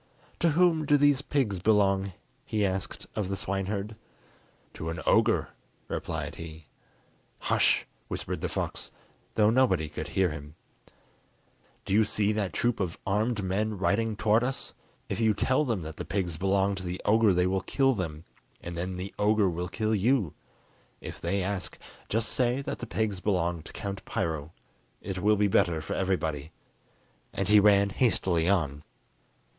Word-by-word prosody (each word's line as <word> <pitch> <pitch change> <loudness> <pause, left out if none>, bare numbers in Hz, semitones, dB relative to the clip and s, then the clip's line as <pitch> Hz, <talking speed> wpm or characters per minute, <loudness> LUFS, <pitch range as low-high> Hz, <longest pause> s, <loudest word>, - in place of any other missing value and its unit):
"To 170 - +3
whom 165 -4 +4
do 145 - +5
these 145 -1 +4
pigs 130 -10 0
belong?" 100 -1 +2 0.3
he 105 -2 0
asked 95 -1 -3
of 105 -4 -2
the 100 - -1
swineherd. 100 +3 -3 0.8
"To 80 - -5
an 80 0 -4
ogre," - - +3 0.4
replied - - -3
he. 80 -1 -9 0.7
"Hush!" - - +2 0.2
whispered - - -4
the - - -1
fox, - - -3 0.5
though 105 0 +4
nobody 115 -11 +3
could 75 - -5
hear 95 -3 +1
him; 75 -1 -8 1.3
"do - - -2
you 110 +2 +6
see 105 0 +1
that 105 -3 -1
troop 120 -1 0
of 90 -4 -2
armed 105 +2 0
men 105 +3 -1
riding 110 +3 +1
towards 110 +3 +3
us? 130 +1 -3 0.3
If - - -3
you 110 -2 +3
tell 130 +7 +2
them 110 - -1
that 80 0 -7
the - - -4
pigs 90 -4 -2
belong 95 +3 +1
to 95 -1 -5
the 90 0 -4
ogre 110 0 +5
they 90 0 +3
will 95 +1 +1
kill 135 +7 +2
them, 80 -7 -4 0.4
and 85 0 -7
then 90 +2 -3
the 90 +2 -6
ogre 105 -2 +3
will 90 +1 -3
kill 110 +1 -1
you! 110 - +2 0.7
If - - -8
they 100 -1 0
ask, 95 0 -3 0.3
just 115 +1 0
say 125 +2 +1
that - - -4
the 120 - -6
pigs 110 -4 -1
belong 90 -4 0
to - - -11
Count 100 -1 -5
Piro; 80 -2 -2 0.5
it 95 -1 -5
will 105 +3 +4
be 105 0 +3
better 85 -4 +2
for 80 - -4
everybody." 80 -6 -1 0.8
And 95 0 -1
he 105 0 +8
ran 100 -1 +5
hastily 95 -8 +2
on. 75 -7 +1
100 Hz, 165 wpm, -28 LUFS, 90-110 Hz, 1.3 s, he